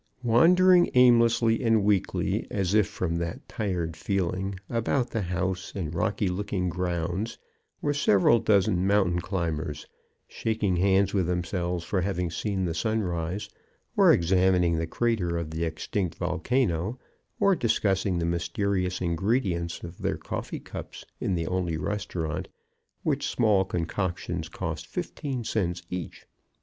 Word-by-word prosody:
Wandering 175 +9 +5
aimlessly 115 -2 +5
and 115 -3 +3
weakly, 100 -2 0
as 95 -2 -1
if 105 -2 +4
from 90 -5 -2
that 85 -1 -4
tired 90 -6 -2
feeling, 95 +2 -1
about 120 +2 0
the 115 - -1
house 90 0 -2
and 85 -5 -3
rocky 100 +4 0
looking 90 0 -1
grounds, 90 +4 -2 0.5
were 145 - +1
several 115 -4 +4
dozen 95 -3 +2
mountain 95 -4 +2
climbers, 80 -5 -3 0.4
shaking 110 -5 -1
hands 95 +2 +3
with 95 -4 +1
themselves 90 0 -1
for 95 +2 -1
having 90 -2 -1
seen 95 +1 -2
the 85 - -1
sunrise, 90 -1 -1 0.5
or - - +6
examining 90 -1 +3
the 80 - -2
crater 95 -5 0
of 80 -2 -4
the 80 +1 -2
extinct 85 +3 -2
volcano, 90 +2 0 0.4
or 195 -1 +4
discussing 100 - +1
the 85 - 0
mysterious 90 +2 -1
ingredients 90 -1 0
of 85 0 -9
their - - -1
coffee - - -5
cups - - -9
in 95 - 0
the 85 -1 -1
only 90 -2 -1
restaurant, 85 -3 -3 0.6
which - - 0
small 105 -5 +3
concoctions 85 -2 -3
cost 80 -2 -5
fifteen 140 - -4
cents 90 -6 -1
each. 90 -2 -6
95 Hz, 135 wpm, -27 LUFS, 85-105 Hz, 0.6 s, or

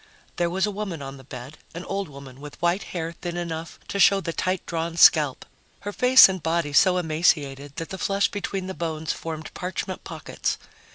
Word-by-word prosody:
There 175 -1 +1
was 190 +3 +1
a 210 - -2
woman 195 -7 -5
on 135 0 -7
the 135 - -13
bed, 130 +2 -10 0.2
an 170 - -6
old 195 -3 -3
woman 135 -1 -12
with 150 0 -10
white 175 +3 +1
hair 165 -2 -4
thin 175 +1 -6
enough 165 -1 -5
to 200 - -2
show 195 +2 +6
the 170 -3 -4
tight 185 +1 -1
drawn 165 0 -3
scalp, 150 -5 +5 0.4
her 205 0 -5
face 255 +3 +8
and 190 -2 -4
body 165 -2 -1
so 180 +4 +5
emaciated 150 -4 0
that 165 - -5
the 190 - -6
flesh 200 +1 +2
between 195 -2 -4
the 190 - -5
bones 160 -3 -3
formed 160 -1 -7
parchment 180 +1 -4
pockets. - - -3
170 Hz, 195 wpm, -25 LUFS, 155-185 Hz, 0.4 s, face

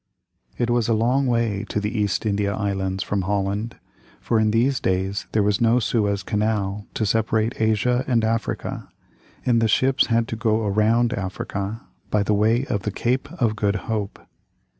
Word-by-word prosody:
It 120 -1 0
was 120 -2 +2
a 115 - +2
long 125 +5 +2
way 115 -4 0
to - - -1
the 105 +3 -3
East 105 -1 0
India 100 -1 0
Islands 95 -2 -2
from 100 -1 -1
Holland, 100 +4 -2 0.4
for 115 - +1
in 110 0 +3
these 125 +5 +2
days 95 +2 -1
there 110 - +2
was 105 +1 +1
no 115 +1 +4
Suez 105 -4 0
Canal 105 -1 -1
to 110 - 0
separate 110 +2 0
Asia 110 +3 +2
and 120 -3 +2
Africa, 115 -1 -2 0.6
and 120 -2 +3
the 115 - +3
ships 130 +5 +3
had 115 -1 +1
to - - -3
go 110 -1 0
around 110 +4 +2
Africa 100 +1 -4 0.3
by 105 -1 +2
way 110 +5 +2
of 105 -6 -2
the 105 - -3
Cape 125 +8 -1
of 120 -10 0
Good 105 -1 0
Hope. 105 -3 -3
110 Hz, 170 wpm, -23 LUFS, 100-115 Hz, 0.6 s, no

